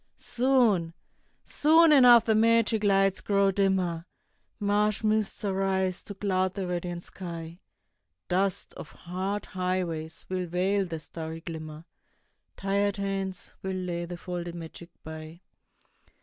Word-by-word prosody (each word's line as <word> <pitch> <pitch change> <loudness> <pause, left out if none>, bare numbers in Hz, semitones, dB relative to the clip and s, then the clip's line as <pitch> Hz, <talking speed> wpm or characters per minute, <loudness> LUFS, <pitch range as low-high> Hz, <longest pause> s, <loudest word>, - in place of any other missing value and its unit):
Soon, 235 -10 +2 0.5
soon 320 +2 +5
enough 245 -5 +8
the 220 - +3
magic 225 0 +3
lights 195 -1 +3
grow 200 -1 +2
dimmer, 185 -3 0 0.5
Marsh 210 +1 +1
mists 215 -1 0
arise 190 -1 0
to 205 - -9
cloud 190 -2 0
the 195 -2 -3
radiant 175 -1 -4
sky, 170 -2 -8 0.7
Dust 190 +1 -1
of - - -9
hard 190 +4 -4
highways 180 -4 -3
will 185 -1 -2
veil 190 +3 +1
the 165 -2 -5
starry 160 +1 -7
glimmer, 160 -1 -8 0.7
Tired 200 +1 0
hands 195 -2 -4
will 190 0 -3
lay 175 -2 -3
the 175 0 -7
folded 175 -1 -5
magic 170 0 -9
by. 160 +1 -9
190 Hz, 120 wpm, -28 LUFS, 175-205 Hz, 0.7 s, enough